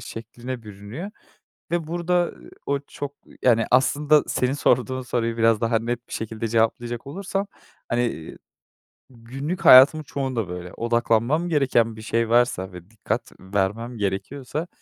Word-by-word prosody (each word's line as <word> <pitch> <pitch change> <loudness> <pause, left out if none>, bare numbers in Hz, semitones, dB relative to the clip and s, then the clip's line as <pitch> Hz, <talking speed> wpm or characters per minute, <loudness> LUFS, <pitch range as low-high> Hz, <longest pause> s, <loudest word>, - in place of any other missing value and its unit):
şekline 120 +2 -7
bürünüyor 105 - -8 0.6
ve 170 -2 -1
burada 175 +1 0 0.3
o 140 0 +1
çok 145 0 -7 0.3
yani 115 -2 +4
aslında, 145 +3 +4
senin 130 +1 0
sorduğun 130 -2 +1
soruyu 115 -2 -1
biraz 115 -2 +3
daha 115 -1 +2
net 120 +1 -4
bir - - -13
şekilde 110 +1 -4
cevaplayacak 115 +2 0
olursam, 195 +5 -3 0.4
hani 120 -9 -2 0.7
günlük 135 +8 -6
hayatımın 140 +5 +9
çoğunda 130 -8 -3
böyle, 90 0 -7
odaklanmam 120 +7 +1
gereken 125 -7 +2
bir 110 - -10
şey 115 +1 0
varsa 120 -6 +2
ve 90 +1 -11
dikkat 110 -1 -4
vermem 105 +5 -2
gerekiyorsa, 125 - -3
120 Hz, 130 wpm, -24 LUFS, 115-140 Hz, 0.7 s, hayatımın